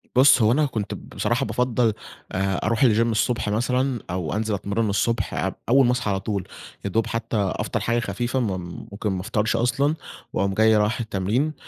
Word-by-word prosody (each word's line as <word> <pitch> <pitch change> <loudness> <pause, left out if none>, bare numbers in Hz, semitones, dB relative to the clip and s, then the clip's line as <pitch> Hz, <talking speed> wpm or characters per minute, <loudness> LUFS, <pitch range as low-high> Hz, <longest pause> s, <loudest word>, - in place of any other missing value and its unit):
بُص، 130 -1 +7
هو 110 +1 +5
أنا 150 +4 +3
كنت 110 -7 -3
بصراحة - - -2
بافضّل 125 -3 +1 0.4
آآ 95 0 0
أروح 115 +5 +2
الجيم 115 -1 +4
الصبح 110 -1 0
مثلًا، 125 +3 0
أو 90 -4 -2
أنزل 110 0 -1
أتمرّن 100 +2 -1
الصبح 115 +4 0
أب - - -2
أوّل 135 +1 +6
ما 120 - +3
أصحى 125 -4 -1
على 95 - 0
طول، 100 -1 -3 0.4
يادوب 110 +3 0
حتّى 115 -1 -2 0.2
أفطر - - -2
حاجة 120 +1 0
خفيفة، 120 +1 -2
م 120 - +1 0.4
ممكن 105 +1 -3
ما 95 -1 -2
أفطرش 105 +3 0
أصلًا 135 +6 +1 0.4
وأقوم 100 +1 0
جاي 110 +1 +4
رايح 105 +3 +1
التمرين 115 +8 -1
115 Hz, 180 wpm, -24 LUFS, 105-125 Hz, 0.4 s, بُص